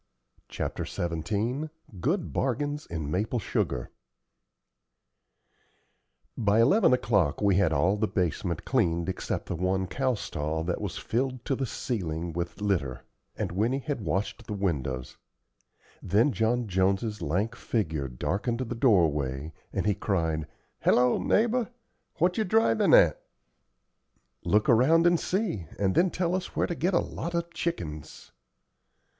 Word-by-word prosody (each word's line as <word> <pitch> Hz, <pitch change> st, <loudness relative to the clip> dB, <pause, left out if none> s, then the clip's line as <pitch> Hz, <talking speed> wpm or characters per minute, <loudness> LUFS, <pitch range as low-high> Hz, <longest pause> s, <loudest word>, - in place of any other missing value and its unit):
CHAPTER -, -, -3 dB
XVII 105 Hz, -, -2 dB, 0.3 s
GOOD 165 Hz, -, -1 dB
BARGAINS 145 Hz, +3 st, -1 dB
IN 80 Hz, -3 st, -4 dB
MAPLE 105 Hz, +7 st, 0 dB
SUGAR 60 Hz, -, -2 dB, 2.4 s
By 105 Hz, -1 st, +2 dB
eleven 190 Hz, -, +5 dB
o'clock 100 Hz, -, +2 dB
we 100 Hz, -3 st, +3 dB
had 95 Hz, -5 st, +3 dB
all 95 Hz, +5 st, +2 dB
the 110 Hz, +1 st, +1 dB
basement 90 Hz, -2 st, -2 dB
cleaned 85 Hz, +1 st, +1 dB
except 95 Hz, -, -3 dB
the -, -, -3 dB
one 95 Hz, +2 st, 0 dB
cow 130 Hz, +7 st, 0 dB
stall 80 Hz, -5 st, -3 dB
that 85 Hz, +1 st, -2 dB
was -, -, -4 dB
filled 130 Hz, +1 st, -2 dB
to 135 Hz, -, 0 dB
the 135 Hz, 0 st, -2 dB
ceiling 85 Hz, -, -3 dB
with 85 Hz, +3 st, -4 dB
litter; 75 Hz, -12 st, -1 dB, 0.3 s
and -, -, -3 dB
Winnie 110 Hz, +8 st, +1 dB
had 140 Hz, -3 st, -3 dB
washed 95 Hz, +4 st, -2 dB
the 105 Hz, -, -3 dB
windows. 65 Hz, -10 st, -2 dB, 0.8 s
Then 105 Hz, +10 st, +3 dB
John 120 Hz, 0 st, 0 dB
Jones's 95 Hz, +3 st, 0 dB
lank 95 Hz, +9 st, -1 dB
figure 80 Hz, -, -2 dB
darkened 100 Hz, -, -2 dB
the 120 Hz, -1 st, -3 dB
doorway, 80 Hz, -, +2 dB, 0.2 s
and -, -, -2 dB
he 105 Hz, -, +3 dB
cried, 80 Hz, -7 st, -1 dB, 0.3 s
"Hello, 125 Hz, 0 st, +3 dB
neighbor, 235 Hz, +1 st, +2 dB, 0.5 s
what 180 Hz, +4 st, +1 dB
ye -, -, +3 dB
drivin' 215 Hz, -, +4 dB
at?" -, -, +5 dB, 1.2 s
"Look 105 Hz, +1 st, +2 dB
around 150 Hz, +9 st, +5 dB
and 175 Hz, -1 st, +4 dB
see, 180 Hz, -, -1 dB
and 95 Hz, -2 st, +1 dB
then 180 Hz, -, +4 dB
tell 175 Hz, 0 st, -1 dB
us 185 Hz, -1 st, -3 dB
where -, -, +2 dB
to -, -, -3 dB
get 175 Hz, +3 st, 0 dB
a -, -, +5 dB
lot 170 Hz, +1 st, -4 dB
of 170 Hz, 0 st, -2 dB
chickens." 75 Hz, -, -5 dB
105 Hz, 140 wpm, -28 LUFS, 85-130 Hz, 2.4 s, eleven